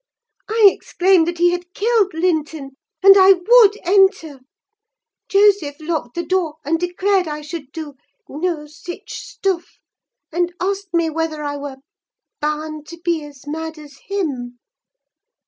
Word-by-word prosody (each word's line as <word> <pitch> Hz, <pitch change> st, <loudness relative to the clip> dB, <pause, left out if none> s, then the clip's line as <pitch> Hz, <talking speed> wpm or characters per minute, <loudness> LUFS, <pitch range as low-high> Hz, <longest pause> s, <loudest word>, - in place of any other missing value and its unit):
I 445 Hz, 0 st, +4 dB
exclaimed 360 Hz, -2 st, +2 dB
that 345 Hz, 0 st, -3 dB
he 350 Hz, +1 st, +4 dB
had 355 Hz, +1 st, -5 dB
killed 420 Hz, -4 st, +1 dB
Linton, 315 Hz, -4 st, -1 dB, 0.3 s
and 390 Hz, 0 st, +9 dB
I 385 Hz, 0 st, +8 dB
would 420 Hz, +3 st, +5 dB
enter. 380 Hz, -6 st, +2 dB, 0.9 s
Joseph 395 Hz, -7 st, +3 dB
locked 310 Hz, -6 st, -4 dB
the 345 Hz, -, -3 dB
door, 345 Hz, -3 st, -1 dB
and 325 Hz, +3 st, 0 dB
declared 365 Hz, +1 st, 0 dB
I 300 Hz, 0 st, -5 dB
should 300 Hz, -2 st, -8 dB
do 310 Hz, -2 st, -7 dB, 0.3 s
'no 315 Hz, 0 st, -3 dB
sich 350 Hz, +6 st, -10 dB
stuff,' 365 Hz, -3 st, -4 dB, 0.5 s
and 350 Hz, +1 st, -1 dB
asked 390 Hz, 0 st, -3 dB
me 335 Hz, -2 st, +1 dB
whether 315 Hz, -1 st, -3 dB
I 290 Hz, 0 st, -3 dB
were 280 Hz, -2 st, -7 dB, 0.6 s
'bahn 305 Hz, 0 st, -3 dB
to 335 Hz, +2 st, -11 dB
be 335 Hz, -2 st, -1 dB
as 290 Hz, -2 st, -13 dB
mad 320 Hz, +2 st, -5 dB
as 295 Hz, -2 st, -14 dB
him. 275 Hz, -12 st, -3 dB
335 Hz, 140 wpm, -19 LUFS, 300-380 Hz, 0.9 s, and